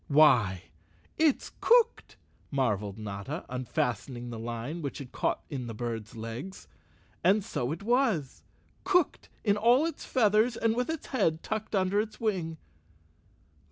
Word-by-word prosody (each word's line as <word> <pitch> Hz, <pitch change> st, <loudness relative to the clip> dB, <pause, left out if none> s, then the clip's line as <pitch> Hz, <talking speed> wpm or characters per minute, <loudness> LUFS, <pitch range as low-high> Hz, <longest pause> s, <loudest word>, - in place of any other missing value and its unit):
"Why, 125 Hz, -, +4 dB, 0.5 s
it's 310 Hz, -4 st, +2 dB
cooked!" 475 Hz, -1 st, +3 dB, 0.3 s
marveled 105 Hz, -7 st, 0 dB
Notta, 105 Hz, -, -5 dB
unfastening 125 Hz, -1 st, -2 dB
the 115 Hz, -, -6 dB
line 120 Hz, +8 st, -4 dB
which 140 Hz, -3 st, -4 dB
had 135 Hz, -4 st, -8 dB
caught -, -, -1 dB
in 130 Hz, -5 st, -5 dB
the 115 Hz, -, -6 dB
bird's 115 Hz, -2 st, -4 dB
legs. 115 Hz, +12 st, -7 dB, 0.6 s
And 200 Hz, +3 st, +4 dB
so 125 Hz, +2 st, -2 dB
it 165 Hz, +5 st, -5 dB
was—cooked 245 Hz, -, 0 dB
in 205 Hz, -2 st, +3 dB
all 240 Hz, +7 st, +5 dB
its 330 Hz, -, -4 dB
feathers 225 Hz, 0 st, +3 dB
with 230 Hz, +3 st, +1 dB
its 320 Hz, -2 st, -3 dB
head 165 Hz, -10 st, +1 dB
tucked 215 Hz, 0 st, -3 dB
under 195 Hz, +2 st, +2 dB
its 220 Hz, 0 st, -7 dB
wing. 180 Hz, -8 st, -1 dB
160 Hz, 130 wpm, -29 LUFS, -, 0.6 s, all